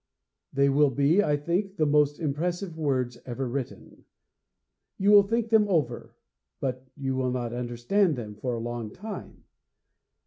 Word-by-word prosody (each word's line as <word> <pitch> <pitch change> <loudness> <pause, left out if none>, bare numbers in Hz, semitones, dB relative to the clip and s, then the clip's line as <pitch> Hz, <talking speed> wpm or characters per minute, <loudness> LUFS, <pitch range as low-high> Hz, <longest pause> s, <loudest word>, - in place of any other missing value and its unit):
They 140 0 +3
will 140 +1 +4
be, 145 +8 +3
I 150 -4 +2
think, 180 +6 -1
the 155 - +2
most 145 0 +3
impressive 170 +4 -2
words 130 -6 -1
ever 130 +1 -4
written. 130 +1 -6 0.9
You 200 +2 +3
will 205 -1 +9
think 225 +3 -1
them 220 -2 +4
over, 150 -11 -1 0.4
but 130 0 -3
you 135 -2 -2
will 130 -1 0
not 120 -2 -3
understand 125 - +1
them 110 -4 -6
for 120 +4 -3
a - - -4
long 120 -1 -4
time. 210 - -9
140 Hz, 150 wpm, -27 LUFS, 125-175 Hz, 0.9 s, will